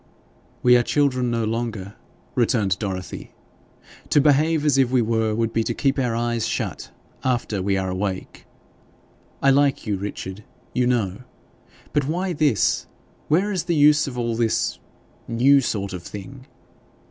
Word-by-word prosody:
'We 125 0 +7
are - - +3
children 130 -2 +1
no 115 -1 0
longer,' 110 -3 -3 0.4
returned 110 -6 +1
Dorothy. 95 -3 -5 0.7
'To - - +4
behave 150 +2 +3
as 140 -2 +3
if 130 -2 +3
we 130 0 +2
were 110 -1 0
would 115 0 -1
be 115 - +1
to 115 - -2
keep 140 -1 +1
our 120 -3 0
eyes 120 -1 -1
shut - - -3 0.3
after 120 -6 -1
we 95 +1 +1
are 95 -1 -2
awake. 95 0 -4 1.0
I 135 - +6
like 140 0 +2
you, 105 -3 -1
Richard, 100 0 -6 0.3
you 125 -1 +1
know; 105 -7 0 0.7
but 145 -2 +1
why 180 +4 -1
this 145 -8 +1 0.4
where 190 +7 +2
is 180 -4 -2
the 170 -1 0
use 150 0 +5
of 125 -2 -6
all 120 -1 -1
this 115 -1 0 0.5
new 135 +4 +4
sort 100 -6 -2
of 90 - -5
thing? 130 +9 -10
120 Hz, 155 wpm, -23 LUFS, 105-140 Hz, 1.0 s, We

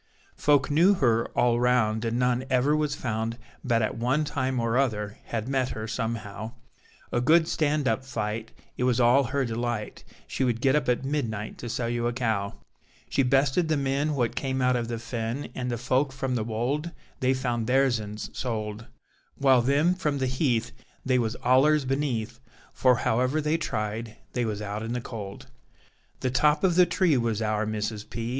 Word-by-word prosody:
Folk 145 -1 +2
knew 175 +7 +5
her 115 -7 +2
all 120 -1 +3
round 120 -3 +2
and 115 0 -1
none 125 0 +1
ever 130 +3 +3
was 150 -1 0
found 115 -2 -3 0.3
but 115 -3 +2
at 110 - -1
one 130 +6 +1
time 130 -3 -1
or 115 0 0
other 105 -6 0
had 115 0 -3
met 130 -1 0
her 110 0 -5
somehow, 110 -1 -4 0.6
A 120 - +1
good 160 +5 +4
stand 150 -4 +1
up 110 +2 +1
fight 110 -4 -4 0.3
it - - -1
was 125 -1 +2
all 125 +3 +5
her 135 +2 0
delight: 115 -2 -3 0.2
she - - -2
would 120 -3 +1
get 135 +3 +3
up 150 - +1
at 125 +2 +1
midnight 115 -7 -3
to 120 - -6
sell 120 +1 -2
you 120 0 -1
a 120 - -1
cow; 110 -5 -1 0.6
She 140 - +2
bested 135 +5 +2
the 155 -1 +1
men 140 +2 0
what 120 -4 0
came 130 -1 -2
out 125 0 +3
of 120 -1 -1
the 115 0 -3
Fen, 115 +3 -4
and 125 -1 -3
the 120 - -1
folk 130 +3 +1
from 130 -1 -3
the 120 -3 0
Wold 120 +9 -2 0.3
they 130 +1 +2
found 120 -3 -2
theirsens 120 -6 0
sold, 110 -2 -4 0.5
While 135 -3 +5
them 145 +8 +3
from 155 -6 -1
the 135 - 0
Heath 125 -3 0 0.3
they 130 -1 +3
was 115 -1 -1
allers 140 +3 +4
beneath; 130 -4 -2 0.3
for 130 -1 +4
however 125 +6 +1
they 155 +1 +1
tried 110 -3 -3 0.2
they 120 -1 0
was 105 -1 -3
out 105 +1 -4
in 115 +1 -3
the 125 - -1
cold. 100 -4 -7 0.8
The 130 - 0
top 150 +3 +3
of 185 -2 +4
the 180 +1 +5
tree 170 -4 +2
was 115 -3 0
our 110 0 0
Mrs. 105 0 -3
P. 115 0 -4
125 Hz, 190 wpm, -27 LUFS, 115-135 Hz, 0.8 s, knew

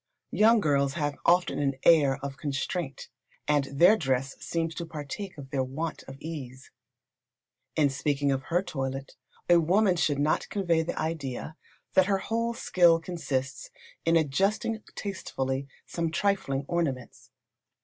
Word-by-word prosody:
Young 225 +2 +5
girls 140 -3 +2
have 145 -3 -1
often 175 +1 +3
an 140 -2 0
air 145 -5 +6
of 140 -1 -4
constraint, 145 +1 -3 0.4
and 145 -2 +3
their 170 +10 +5
dress 135 - -1
seems 165 -1 -2
to 170 - -5
partake 165 +4 -6
of 135 -1 -10
their 135 -2 +1
want 150 +5 -4
of 135 - -9
ease. 135 -5 -8 1.0
In 145 -3 +3
speaking 140 0 0
of 135 -1 -2
her 175 +2 +1
toilet, 135 -5 -4 0.3
a 175 -1 +6
women 185 +4 +3
should 150 -4 +1
not 150 +2 +1
convey 175 -5 +1
the 160 - -4
idea 155 -2 -3 0.4
that 190 0 +5
her 200 -1 +2
whole 230 +4 -2
skill 170 -6 +4
consists 140 -6 -3 0.3
in 165 0 +3
adjusting 195 +8 +1
tastefully 135 -9 -3 0.2
some 170 -1 -2
trifling 165 -7 0
ornaments. 130 -7 -3
155 Hz, 140 wpm, -28 LUFS, 135-175 Hz, 1.0 s, air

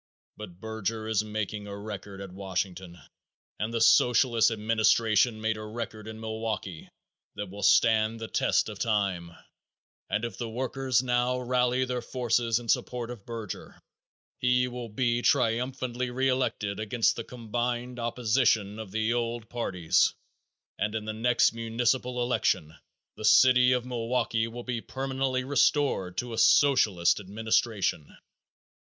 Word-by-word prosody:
But 95 -5 -10
Berger 110 0 -4
is 110 -2 +1
making 105 -1 -4
a 100 0 -7
record 100 -1 -7
at 100 -2 -8
Washington 95 -2 -4 0.6
and 105 +3 -2
the 115 - -1
Socialist 120 0 +4
administration 110 +1 +2
made 110 0 -1
a 110 - -7
record 110 0 -6
in 110 0 -8
Milwaukee 110 -6 -5 0.5
that 105 -2 -6
will 100 +1 -8
stand 110 0 +3
the 115 - -5
test - - +1
of - - -8
time, 100 -6 -1 0.8
and 110 +3 -1
if 115 -5 -7
the 120 -2 -3
workers 130 +1 0
now 125 0 +1
rally 125 0 +1
their 125 -1 -3
forces 120 -2 0
in 120 -1 -7
support 120 +1 -1
of 115 -5 -11
Berger, 115 -4 -7 0.6
he 125 -1 +2
will 125 -1 -6
be 120 +2 0
triumphantly 125 0 0
re 130 +2 0
elected 115 -6 -1
against 110 +2 +1
the 115 - -5
combined 120 +1 -4
opposition 115 -3 +1
of 110 -3 -7
the 110 +3 0
old 120 -1 -3
parties, 90 -9 +1 0.6
and 105 +1 -1
in 110 -1 -3
the 110 - -3
next 120 +1 +2
municipal 120 +2 -1
election 80 -10 0 0.4
the - - -8
City 125 +3 +6
of 125 -1 +1
Milwaukee 115 -2 -1
will 120 +1 -8
be 120 -2 -3
permanently 130 0 -2
restored 135 -8 +1
to 120 -1 -3
a 115 - -2
Socialist 105 -13 +4
administration. 105 -4 -1
115 Hz, 140 wpm, -28 LUFS, 105-125 Hz, 0.8 s, City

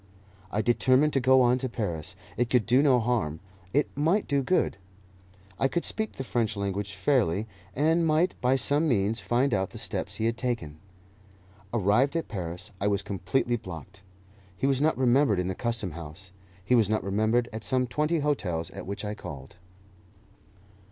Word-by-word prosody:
I 110 - 0
determined 130 +5 +3
to 135 - +3
go 130 0 +5
on 125 +1 +3
to 130 0 -2
Paris; 90 -10 -4 0.2
it 120 +1 0
could 125 -3 +3
do 125 +3 +4
no 135 -4 +4
harm, 110 -10 -1 0.3
it 145 +2 +2
might 165 +9 +1
do 140 -1 +1
good. 135 - +1 0.8
I 135 - +3
could 170 +5 -2
speak 220 -1 -1
the 135 - -5
French 115 -4 -1
language 100 +1 -3
fairly, 105 - +1 0.3
and 160 +4 +2
might, 160 +4 +2
by 130 +1 +3
some 145 +4 +2
means, 110 -3 +1
find 120 +7 +1
out 95 0 0
the - - -10
steps - - -2
he 110 - -2
had 115 +1 0
taken. 115 - -3 0.9
Arrived 120 - +2
at 165 - -1
Paris, 90 -5 -6
I 100 - +1
was 100 -1 +1
completely 120 +5 -1
blocked. 95 0 -10 0.6
He - - -1
was 135 -1 +2
not 155 +1 +2
remembered 130 -3 +3
in 90 0 -1
the - - -1
Custom 115 -3 -2
House; 85 +4 -9 0.3
he 125 - +1
was 115 -4 +4
not 110 0 0
remembered 110 +5 +1
at 110 - -6
some 130 -1 +2
twenty 150 +5 0
hotels 90 - -1
at - - -8
which 100 +2 -4
I 105 - -3
called. 70 - -9
120 Hz, 180 wpm, -27 LUFS, 100-135 Hz, 0.9 s, go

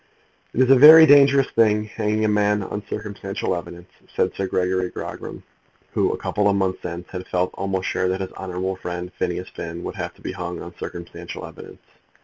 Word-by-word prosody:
"It 130 - +2
is 130 0 +4
a - - +9
very 155 +4 +10
dangerous 140 -2 +6
thing 105 -2 +3
hanging 110 0 -1
a - - +3
man 105 -1 +1
on 105 +2 -5
circumstantial 100 -2 -4
evidence," 85 +1 -9 0.2
said 90 - +1
Sir 95 - -3
Gregory 90 0 0
Grogram, - - -7 0.5
who, - - +1
a - - -3
couple 105 -1 0
of 100 - +2
months 95 -1 -1
since, 85 +1 -6
had 90 -1 -7
felt 90 0 0
almost 95 -1 -3
sure 95 - 0
that 95 +1 -1
his 95 - -5
honourable 95 0 -4
friend 90 0 -6
Phineas 90 +1 -2
Finn 85 +1 -7
would - - -5
have - - -5
to - - -22
be - - -4
hung 90 0 -5
on 85 - -9
circumstantial 85 0 -7
evidence. - - -12
95 Hz, 195 wpm, -22 LUFS, 90-105 Hz, 0.5 s, very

